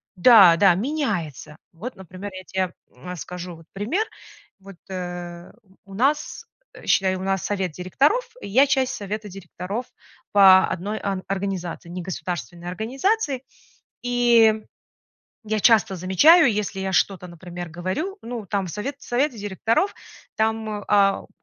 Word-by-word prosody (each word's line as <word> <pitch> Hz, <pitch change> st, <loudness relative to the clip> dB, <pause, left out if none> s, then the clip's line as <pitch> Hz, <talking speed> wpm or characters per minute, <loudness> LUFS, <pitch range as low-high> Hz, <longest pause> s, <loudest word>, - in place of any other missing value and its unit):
да, 190 Hz, -3 st, +8 dB
да, 195 Hz, -2 st, +6 dB
меняется. 190 Hz, -, -3 dB, 0.2 s
Вот, 230 Hz, +10 st, -7 dB
например, 190 Hz, +2 st, -9 dB
я 185 Hz, 0 st, -8 dB
те, 185 Hz, 0 st, -2 dB, 0.2 s
э, 180 Hz, 0 st, -8 dB
скажу 180 Hz, +1 st, -7 dB
вот 165 Hz, -, -17 dB
пример. 250 Hz, -, -1 dB, 0.5 s
Вот, 195 Hz, -2 st, -13 dB
э, 175 Hz, -1 st, -6 dB, 0.3 s
у 195 Hz, -, -13 dB
нас, 280 Hz, +8 st, -1 dB, 0.4 s
считай, 190 Hz, -1 st, +2 dB
у 185 Hz, -, -6 dB
нас 195 Hz, -1 st, -1 dB
совет 190 Hz, -4 st, -1 dB
директоров, 270 Hz, -, +1 dB, 0.2 s
и -, -, -7 dB
я 265 Hz, +8 st, +4 dB
часть 265 Hz, -2 st, +1 dB
совета 210 Hz, +1 st, -5 dB
директоров 195 Hz, +4 st, -6 dB, 0.5 s
по 190 Hz, -2 st, +7 dB
одной 205 Hz, +5 st, -4 dB
о 195 Hz, -2 st, -3 dB
организации, 190 Hz, -3 st, -4 dB
негосударственной 175 Hz, -3 st, -6 dB
организации. 270 Hz, -, -1 dB, 0.6 s
И 240 Hz, -2 st, +4 dB, 0.9 s
я 215 Hz, 0 st, -1 dB
часто 220 Hz, -4 st, +4 dB
замечаю, 240 Hz, -, +6 dB
если 205 Hz, -2 st, -3 dB
я 190 Hz, 0 st, -2 dB
что-то, 185 Hz, -1 st, +1 dB
например, 175 Hz, 0 st, -8 dB
говорю, 185 Hz, -, -4 dB
ну 235 Hz, -3 st, -6 dB
там 195 Hz, -1 st, -1 dB
в -, -, -6 dB
совет 255 Hz, -, -4 dB
совете 250 Hz, +1 st, 0 dB
директоров, 225 Hz, -, 0 dB, 0.4 s
там, 220 Hz, -1 st, -1 dB
а, 200 Hz, -1 st, +4 dB
в -, -, -18 dB
195 Hz, 135 wpm, -23 LUFS, 180-230 Hz, 0.9 s, да